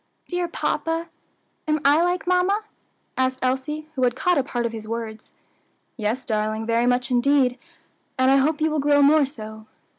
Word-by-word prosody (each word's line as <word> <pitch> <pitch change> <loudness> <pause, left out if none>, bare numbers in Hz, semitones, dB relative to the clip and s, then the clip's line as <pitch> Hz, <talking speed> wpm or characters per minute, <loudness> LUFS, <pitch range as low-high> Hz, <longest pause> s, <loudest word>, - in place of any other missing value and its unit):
"Dear 355 -1 -2
papa, 330 0 -2 0.6
am 305 0 +1
I 290 +3 +5
like 355 +1 0
mamma?" 365 +4 +2 0.5
asked 260 0 +1
Elsie, 270 +4 -2
who 265 - -4
had 245 -1 +2
caught 355 +3 +2
a - - +1
part 245 -3 -3
of 230 - -1
his 220 -1 -8
words. 225 -1 -6 0.6
"Yes, 225 +3 -2
darling, 215 0 -1
very 230 +1 +1
much 245 0 +1
indeed, 255 0 +2 0.6
and 260 +1 +4
I 275 - +5
hope 300 +3 +1
you 315 0 +2
will 305 - 0
grow 285 0 +4
more 290 0 +5
so." 220 -5 -9
265 Hz, 175 wpm, -23 LUFS, 235-310 Hz, 0.6 s, I